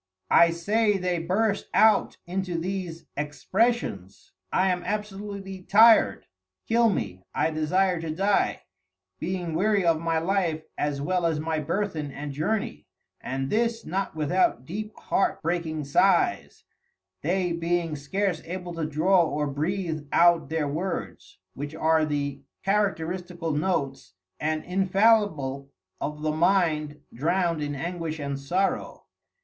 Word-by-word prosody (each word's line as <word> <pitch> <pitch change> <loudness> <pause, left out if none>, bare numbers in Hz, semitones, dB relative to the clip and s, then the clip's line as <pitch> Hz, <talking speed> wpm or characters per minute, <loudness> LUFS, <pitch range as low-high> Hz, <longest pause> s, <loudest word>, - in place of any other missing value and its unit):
_) - - +5
I 170 - +7
say 205 +5 +1
they 180 -2 -1
burst 200 +5 0
out 215 -2 +4
into 180 -1 -2
these 175 -1 -4
Expressions, 150 - -1 0.2
I 190 0 +3
am 180 0 -1
absolutely 200 -1 -5
tir'd, 220 +4 +5 0.4
kill 230 0 +4
me, 95 - -3
I 160 - +1
desire 175 +3 +1
to 165 - -4
dye, 195 +6 +1 0.6
being 180 -2 -3
weary 200 +3 +2
of 165 -2 +3
my 165 0 0
Life 165 -2 0
as 145 -1 -2
well 180 +1 +1
as 160 -2 -1
my 160 0 -1
Burthen 160 -1 -2
and 145 +1 -6
Journey: 155 - -2 0.3
And 135 +1 -3
this 230 +1 0
not 190 +1 -2
without 150 -5 +1
deep 210 +7 -5
Heart 195 0 0
breaking 165 -2 -1
Sighs, 145 - +2 0.6
they 180 +2 0
being 170 -1 -1
scarce 175 +4 -1
able 180 0 -5
to 165 -2 -2
draw 170 +5 +3
or 150 -2 -1
breathe 155 +2 -2
out 170 -4 +4
their 160 -2 0
words, 170 +6 -4 0.2
which 145 +3 -6
are 160 0 +3
the 140 -2 -2 0.2
Characteristical 180 -4 -1
Notes, 140 - -2 0.2
and 155 0 -1
infallible 190 -8 +2 0.3
of 150 +1 -4
the 155 - +1
Mind 155 -3 +1
drowned 170 +4 0
in 145 -1 -3
Anguish 165 +1 -4
and 140 -2 -4
Sorrow. 180 +8 -1
170 Hz, 135 wpm, -26 LUFS, 155-195 Hz, 0.6 s, I